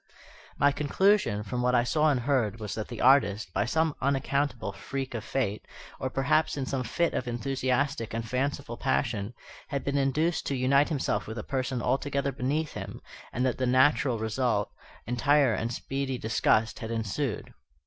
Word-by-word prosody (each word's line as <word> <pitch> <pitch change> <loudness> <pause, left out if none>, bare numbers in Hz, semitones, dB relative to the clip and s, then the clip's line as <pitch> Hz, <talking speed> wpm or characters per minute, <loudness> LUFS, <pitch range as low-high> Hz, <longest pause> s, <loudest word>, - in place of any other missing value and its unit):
My 145 - +4
conclusion, 150 - +2
from 125 +4 -3
what 125 0 +2
I 120 - +4
saw 155 +5 +2
and 135 -4 +1
heard, 120 -5 0
was 105 -2 -4
that 110 -1 -4
the 120 - -6
artist, 110 -8 +4
by 100 - +1
some 160 +5 +1
unaccountable 140 -4 0
freak 135 +5 -5
of 115 -3 -4
fate, 120 -4 -2 0.4
or 130 - -2
perhaps 145 +4 +1
in 135 - -1
some 130 -1 -2
fit 170 +8 0
of 125 - -2
enthusiastic 130 +1 -1
and 115 0 -3
fanciful 130 +4 -2
passion, 100 - -1 0.3
had 140 -2 -3
been 140 0 0
induced 155 +5 +1
to 140 - 0
unite 140 +3 +3
himself 145 -5 -1
with 110 +2 -6
a 110 - -4
person 130 -2 -2
altogether 140 +2 0
beneath 145 +5 -1
him, 100 -1 -6 0.3
and 125 +2 0
that 130 - 0
the 130 - +1
natural 130 0 +3
result, 110 -1 0 0.3
entire 130 +2 +3
and 115 +2 -2
speedy 135 +2 -3
disgust, 110 0 +1
had 110 - -5
ensued. 115 +3 -3
130 Hz, 170 wpm, -28 LUFS, 115-140 Hz, 0.4 s, My